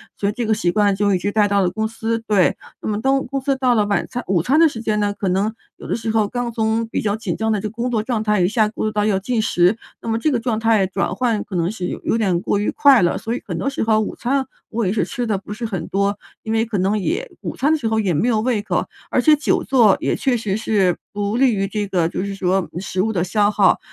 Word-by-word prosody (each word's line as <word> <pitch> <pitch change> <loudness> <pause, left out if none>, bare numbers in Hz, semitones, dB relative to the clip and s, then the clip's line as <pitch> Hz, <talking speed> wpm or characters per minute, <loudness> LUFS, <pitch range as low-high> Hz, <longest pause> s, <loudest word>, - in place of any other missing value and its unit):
所 200 - -1
以 - - 0
这 240 +2 -3
个 220 - +2
习 175 -4 0
惯 205 0 +2
就 200 0 +1
一 185 - +3
直 200 - -2
带 205 -1 +2
到 200 - +2
了 185 -2 +2
公 220 +4 -2
司。 225 0 -2
对， 200 -5 +3 0.3
那 - - -5
么 210 0 -1
当 270 +1 +1
公 275 -1 -3
司 275 0 0
到 255 -2 +2
了 215 - +3
晚 200 - 0
餐 245 -1 -5
午 185 -3 +2
餐 280 +8 +3
的 330 -1 +6
时 235 - -7
间 215 -2 0
呢， 205 0 +1
可 195 - -2
能 195 +4 0 0.2
有 - - -10
的 - - -1
时 225 -1 -3
候 220 -2 +2
刚 245 +2 -3
从 225 0 0
比 - - -2
较 205 -1 0
紧 220 - -3
张 220 0 -1
的 215 - +1
这 215 - -3
工 235 +3 -3
作 225 -3 0
状 230 -2 -1
态 210 -1 +1
一 175 - +4
下 215 +1 +2
步 220 - -4
入 215 - 0
到 210 -1 0
要 200 -3 +2
进 225 +4 -1
食， 180 -1 +3 0.3
那 - - -8
么 225 0 0
这 310 - +1
个 245 - +1
状 230 -2 -1
态 225 -3 +3
转 190 - -2
换 235 -5 0
可 190 - -8
能 170 +1 0
是 185 -5 -4
有 - - -5
有 - - +1
点 190 -6 +1
过 - - 0
于 205 - 0
快 280 -4 +5
了。 175 - +1
所 225 - -4
以 - - -5
很 - - -4
多 - - -2
时 275 - -2
候 220 -1 +3
午 215 - -3
餐 265 +2 0 0.2
我 230 -1 -1
也 190 - 0
是 225 - +1
吃 245 -3 -3
得 215 -4 0
不 200 - -12
是 230 +3 -5
很 190 -7 -4
多， 200 +1 0 0.3
因 220 - -3
为 225 0 +2
可 230 -2 -3
能 195 +3 +1
也 405 - -2
午 - - -5
餐 290 +3 +1
的 315 - +3
时 235 -7 -3
候 220 0 +1
也 195 -5 +1
没 160 +10 +1
有 225 -3 +2
胃 230 -3 0
口， 210 - -1 0.2
而 - - +1
且 305 +5 +6
久 300 +1 0
坐 235 -7 +4
也 - - 0
确 255 -3 +1
实 205 -3 -2
是 205 -5 +1 0.2
不 205 +2 -2
利 265 -1 +4
于 195 -2 -1
这 205 -1 -3
个 180 -4 +1
就 175 - -3
是 200 0 -4
说 190 -1 0
食 185 0 -2
物 220 +3 0
的 175 -4 0
消 205 +2 +2
耗。 200 -3 +3
215 Hz, 320 characters per minute, -20 LUFS, 200-235 Hz, 0.3 s, 的